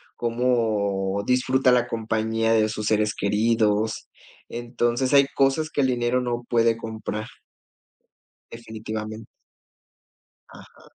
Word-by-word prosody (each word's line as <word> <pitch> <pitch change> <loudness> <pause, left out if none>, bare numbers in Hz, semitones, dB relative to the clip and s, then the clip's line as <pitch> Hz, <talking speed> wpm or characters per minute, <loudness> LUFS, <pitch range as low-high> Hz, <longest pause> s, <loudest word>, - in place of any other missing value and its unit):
cómo 110 -5 0
disfruta 130 +1 +2
la 125 -1 +3
compañía 115 0 0
de 110 -1 +3
sus 110 0 -4
seres 105 -1 +1
queridos. 110 +1 +1 0.4
Entonces, 120 +2 -1
hay 140 -1 +7
cosas 140 +3 +2
que 145 - 0
el 130 - +3
dinero 125 0 0
no 120 -1 -3
puede 115 -1 +3
comprar. 110 -1 -5 1.2
Definitivamente. 110 -1 -7 1.2
Ajá. - - -16
115 Hz, 105 wpm, -24 LUFS, 110-120 Hz, 1.2 s, hay